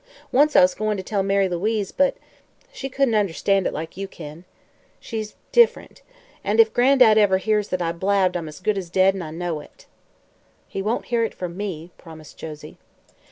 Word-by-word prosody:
Once 290 Hz, +3 st, +3 dB
I -, -, +8 dB
was 180 Hz, 0 st, +4 dB
goin' 215 Hz, -1 st, -2 dB
to 190 Hz, -, -5 dB
tell 200 Hz, +1 st, -1 dB
Mary 195 Hz, 0 st, +2 dB
Louise, 200 Hz, +3 st, -1 dB
but 280 Hz, 0 st, +2 dB, 0.6 s
she 270 Hz, -, -6 dB
couldn't 270 Hz, -2 st, +1 dB
understand 195 Hz, -1 st, +1 dB
it -, -, -2 dB
like 160 Hz, +3 st, -7 dB
you 195 Hz, 0 st, -4 dB
kin. 160 Hz, -1 st, -11 dB, 0.5 s
She's 220 Hz, -2 st, -6 dB, 0.2 s
diff'rent. 475 Hz, -1 st, +2 dB, 0.4 s
And -, -, 0 dB
if 450 Hz, 0 st, +6 dB
Gran'dad 245 Hz, -4 st, +5 dB
ever 195 Hz, -3 st, +4 dB
hears 210 Hz, +1 st, 0 dB
that 185 Hz, -1 st, -2 dB
I 165 Hz, -, -1 dB
blabbed 190 Hz, +1 st, +1 dB
I'm 170 Hz, -2 st, -3 dB
as 150 Hz, -, -10 dB
good 210 Hz, 0 st, 0 dB
as 180 Hz, -3 st, -8 dB
dead, 190 Hz, +2 st, +3 dB
an' 190 Hz, -, -5 dB
I 160 Hz, -, -6 dB
know 165 Hz, 0 st, -4 dB
it!" 145 Hz, -, -16 dB, 0.8 s
"He 195 Hz, -, -5 dB
won't 215 Hz, +5 st, -2 dB
hear 230 Hz, -1 st, +3 dB
it 225 Hz, -, -3 dB
from 175 Hz, -2 st, -6 dB
me," 180 Hz, -4 st, -5 dB
promised 160 Hz, -2 st, -13 dB
Josie. 155 Hz, -1 st, -10 dB
195 Hz, 195 wpm, -22 LUFS, 175-215 Hz, 0.8 s, I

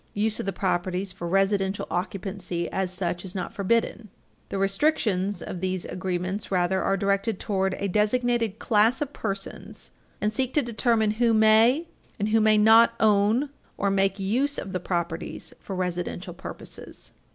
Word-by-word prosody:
Use 215 Hz, +1 st, +1 dB
of -, -, -4 dB
the -, -, +1 dB
properties 185 Hz, 0 st, -1 dB
for 175 Hz, -, -6 dB
residential 195 Hz, +1 st, +1 dB
occupancy, 185 Hz, -1 st, -3 dB
as 190 Hz, -1 st, -1 dB
such, 180 Hz, -1 st, -3 dB
is 190 Hz, 0 st, -7 dB
not 180 Hz, -2 st, -4 dB
forbidden. 215 Hz, +1 st, 0 dB, 0.4 s
The -, -, -3 dB
restrictions 195 Hz, -, +1 dB
of 180 Hz, -, -6 dB
these 185 Hz, -1 st, -2 dB
agreements, 185 Hz, +2 st, -3 dB
rather, 185 Hz, 0 st, +1 dB
are 195 Hz, -, +1 dB
directed 200 Hz, +1 st, 0 dB
toward 190 Hz, -2 st, 0 dB
a 200 Hz, -, -2 dB
designated 225 Hz, +2 st, +1 dB
class 225 Hz, +3 st, +3 dB
of 290 Hz, 0 st, -9 dB
persons 195 Hz, -2 st, -6 dB, 0.3 s
and 210 Hz, 0 st, 0 dB
seek 260 Hz, +3 st, -1 dB
to 295 Hz, -, +3 dB
determine 230 Hz, -2 st, +1 dB
who 230 Hz, -2 st, +4 dB
may 225 Hz, +8 st, +5 dB, 0.3 s
and 205 Hz, +1 st, -1 dB
who 220 Hz, +1 st, +3 dB
may 215 Hz, 0 st, +5 dB
not 225 Hz, +2 st, +6 dB
own 220 Hz, +6 st, +3 dB, 0.3 s
or 200 Hz, -, +1 dB
make 195 Hz, 0 st, +1 dB
use 250 Hz, +9 st, 0 dB
of 190 Hz, -, -5 dB
the 185 Hz, -, -1 dB
properties 170 Hz, -2 st, -4 dB
for 195 Hz, -, -6 dB
residential 180 Hz, 0 st, -3 dB
purposes. 180 Hz, -, -10 dB
200 Hz, 160 wpm, -26 LUFS, 185-220 Hz, 0.4 s, not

